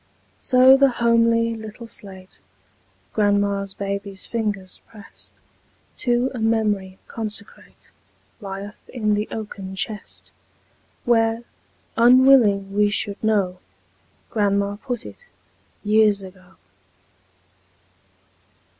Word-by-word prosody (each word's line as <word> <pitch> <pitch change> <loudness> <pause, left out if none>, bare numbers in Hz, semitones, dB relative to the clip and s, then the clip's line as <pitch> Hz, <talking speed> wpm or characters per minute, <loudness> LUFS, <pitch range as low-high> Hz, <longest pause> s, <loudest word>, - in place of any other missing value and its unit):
So 260 +1 +6
the 275 0 +5
homely 230 -1 +2
little 220 +1 -9
slate 190 -4 -10 0.7
Grandma's 200 -1 0
baby's 200 -1 -3
fingers 205 -5 -4
pressed, 210 -3 -15 0.6
To 245 +1 +1
a 250 - -5
memory 210 -4 0
consecrate, 215 -2 -9 0.5
Lieth 200 0 -8
in 215 -4 -1
the 210 +1 -1
oaken 200 -3 -7
chest, 210 +1 -5 0.7
Where, 225 -1 +2 0.5
unwilling 235 -5 +5
we 205 0 +3
should 205 0 -2
know, 195 -4 +1 0.7
Grandma 200 -1 0
put 245 +1 -5
it, - - -12 0.6
years 210 -1 +3
ago. 185 0 -14
210 Hz, 90 wpm, -22 LUFS, 200-230 Hz, 0.7 s, So